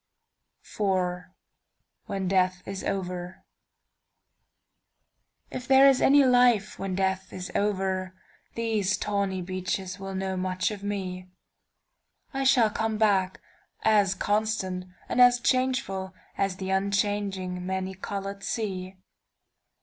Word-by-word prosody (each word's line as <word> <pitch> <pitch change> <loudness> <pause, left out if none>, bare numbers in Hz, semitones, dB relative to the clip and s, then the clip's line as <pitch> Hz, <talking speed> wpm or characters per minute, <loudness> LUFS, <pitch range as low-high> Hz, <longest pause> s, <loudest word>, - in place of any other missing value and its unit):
IV. 180 -3 -1 0.8
WHEN 195 -1 -2
DEATH 185 -1 +1
IS 195 -1 -5
OVERIf 180 -1 -3 2.3
there 270 0 +7
is 270 -2 +4
any 285 +1 +6
life 245 -5 +3
when 195 -1 -3
death 190 0 -1
is 180 -1 -6
over, 190 -2 -1 0.4
These 220 -4 0
tawny 200 -3 -1
beaches 185 +1 -3
will 195 0 -6
know 190 0 -2
much 185 +2 -1
of 205 -2 -7
me,I 190 +6 -8
shall 245 -5 +5
come 220 0 -1
back, 195 -4 +2 0.4
as 205 -3 +4
constant 205 -3 -1 0.2
and 250 - +2
as 245 0 +7
changefulAs 195 -7 -1
the 190 -1 -4
unchanging, 195 -2 -1
many 190 0 -3
colored 195 +1 -5
sea. 190 -4 -3
195 Hz, 105 wpm, -27 LUFS, 185-210 Hz, 2.3 s, there